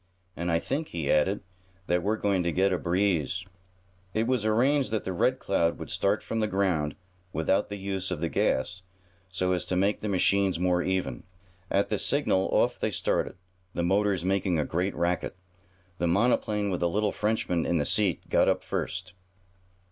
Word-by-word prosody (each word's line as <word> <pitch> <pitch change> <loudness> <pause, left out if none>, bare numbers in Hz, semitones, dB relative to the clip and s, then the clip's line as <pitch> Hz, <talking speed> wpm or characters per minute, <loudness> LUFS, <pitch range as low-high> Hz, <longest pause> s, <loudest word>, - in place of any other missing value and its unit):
And 85 +1 -2
I 85 - +3
think," 140 - -2
he 80 -4 -2
added, 95 +7 +2 0.4
"that 90 0 +1
we're 105 +4 0
going 100 -3 +1
to 85 - +1
get 95 +3 +2
a 90 - 0
breeze." 90 -2 0 0.7
It 110 +1 +2
was 120 -3 +1
arranged 130 +6 +3
that 110 -1 -1
the 95 - -3
Red 130 +9 +2
Cloud 85 -8 0
would - - -7
start 100 +2 +1
from 115 - -2
the 110 - +1
ground, 90 -7 0 0.4
without 95 +6 +1
the 100 - -5
use 95 -1 -3
of 90 -4 -3
the 85 - 0
gas, 85 +3 0 0.5
so 90 0 -1
as 90 -1 +1
to 90 - -1
make 100 +3 +2
the 105 - -3
machines 95 0 +2
more 90 0 +2
even. 95 0 -1 0.5
At 100 - +1
the 105 - 0
signal 130 -9 +1
off - - +2
they - - 0
started, - - -1 0.4
the 85 - 0
motors 95 0 +1
making 95 -2 +1
a 75 - +1
great 90 +4 -1
racket. 85 +1 -1 0.6
The 85 - +1
monoplane 105 +1 +2
with 90 - -1
the 85 - +1
little 105 +3 +1
Frenchman 105 -6 0
in 85 - +2
the 75 - 0
seat 100 -2 +1
got - - +3
up - - 0
first. 95 -1 -4
95 Hz, 185 wpm, -28 LUFS, 85-105 Hz, 0.7 s, I